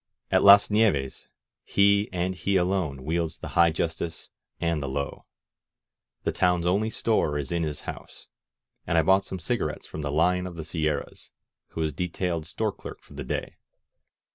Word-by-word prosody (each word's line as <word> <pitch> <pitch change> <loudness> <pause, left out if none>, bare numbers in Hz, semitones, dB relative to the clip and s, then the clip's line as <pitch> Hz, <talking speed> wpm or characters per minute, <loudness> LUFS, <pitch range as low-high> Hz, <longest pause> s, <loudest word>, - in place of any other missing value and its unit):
At - - +4
Las 100 +1 +8
Nieves 100 -12 +1 0.4
he 100 +1 +3
and 90 0 -1
he 95 +3 -1
alone 90 -7 0
wields 80 +1 -1
the - - -7
high 85 0 +5
justice 80 0 -4 0.3
and 85 -3 0
the 70 - -3
low. 70 +1 -4 1.0
The - - 0
town's 90 -2 +1
only 100 +5 +2
store 110 -10 0
is 70 -2 -4
in 85 -1 0
his 75 -2 -3
house, - - -9 0.6
and 85 - +1
I 80 - +5
bought 95 +3 +4
some 95 - -5
cigarettes 85 - -2
from 80 - -7
the 70 - -3
Lion 90 +4 +2
of 90 - -8
the 80 - -5
Sierras, 75 -2 -3 0.4
who 80 - -5
was 80 -2 -1
de 90 +5 -2
tailed 85 -2 -3
store - - -1
clerk - - -10
for - - -17
the - - -6
day. - - -4
85 Hz, 175 wpm, -26 LUFS, 80-95 Hz, 1.0 s, Las